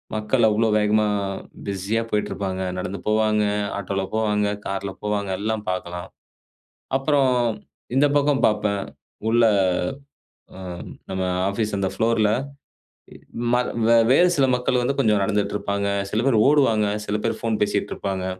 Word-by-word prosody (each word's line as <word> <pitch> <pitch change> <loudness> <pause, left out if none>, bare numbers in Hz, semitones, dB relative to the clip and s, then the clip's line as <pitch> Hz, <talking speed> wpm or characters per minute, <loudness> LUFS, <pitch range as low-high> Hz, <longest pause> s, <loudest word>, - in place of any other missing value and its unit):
மக்கள் 110 +2 +2
அவ்வளோ 110 +2 +2
வேகமா, 105 0 +2 0.6
பிஸியா 100 +4 -1
போயிட்டுருப்பாங்க, 100 -2 -2 0.2
நடந்து 95 +2 -4
போவாங்க, 110 0 +2 0.3
ஆட்டோவில 95 0 -2
போவாங்க, 105 -2 +1 0.2
கார்ல 95 0 -3
போவாங்க, 105 -1 -1
எல்லாம் 110 0 -2
பார்க்கலாம். 90 -1 -4 0.9
அப்பறம் 135 -2 +2 0.6
இந்த 145 +2 +5
பக்கம் 145 -1 +1
பார்ப்பேன். 105 -2 0 0.5
உள்ள 115 0 +4 1.1
ஆ - - -10 0.5
நம்ம 95 0 -2 0.3
ஆபீஸ் 105 +1 -2
அந்த 95 - 0
புளோர்ல 110 -2 +2 1.2
ம - - +5 0.6
வேறு 175 +7 +6
சில 135 -2 +4
மக்கள் 125 0 0
வந்து 135 +3 0
கொஞ்சம் 105 -6 +3
நடந்துட்டு 105 0 0
இருப்பாங்க. 100 -1 -2 0.2
சில 110 +3 0
பேர் 120 -5 +3
ஓடுவாங்க, 115 -8 +3 0.2
சில 105 - -2
பேர் 115 - -1
போன் 115 -2 -1
பேசிட்டு 105 - -1
இருப்பாங்க. 95 -1 -3
105 Hz, 125 wpm, -23 LUFS, 100-115 Hz, 1.2 s, வேறு